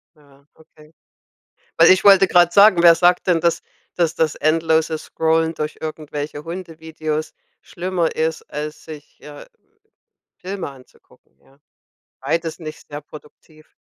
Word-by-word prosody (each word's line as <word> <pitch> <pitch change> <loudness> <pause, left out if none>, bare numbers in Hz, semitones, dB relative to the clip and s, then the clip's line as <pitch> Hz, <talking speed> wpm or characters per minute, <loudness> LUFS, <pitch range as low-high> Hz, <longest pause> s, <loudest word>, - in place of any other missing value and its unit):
Ja, 140 -2 -25
okay. 155 0 -21 0.8
Weil 165 +1 +6
ich 185 - +3
wollte 195 -1 +6
grad 175 -1 +3
sagen, 200 -3 +6
wer 170 -1 +8
sagt 175 +2 +2
denn, 175 -2 +2
dass 170 0 0 0.3
dass 170 -1 0
das 160 -3 0
endlose 160 0 0
Scrollen 160 +1 -1
durch 150 -1 -5
irgendwelche 150 -1 -6
Hundevideos 160 -2 -6 0.3
schlimmer 180 -2 -3
ist, 160 0 -2
als 150 +1 -7
sich, 150 -2 -13
äh, 150 -1 -12 0.9
Filme 190 0 -6
anzugucken, 130 - -20
ja. 135 - -27 0.6
Beides 160 +4 -3
nicht 155 -3 -10
sehr 145 0 -8
produktiv. 155 +1 -17
160 Hz, 130 wpm, -19 LUFS, 150-170 Hz, 0.9 s, wer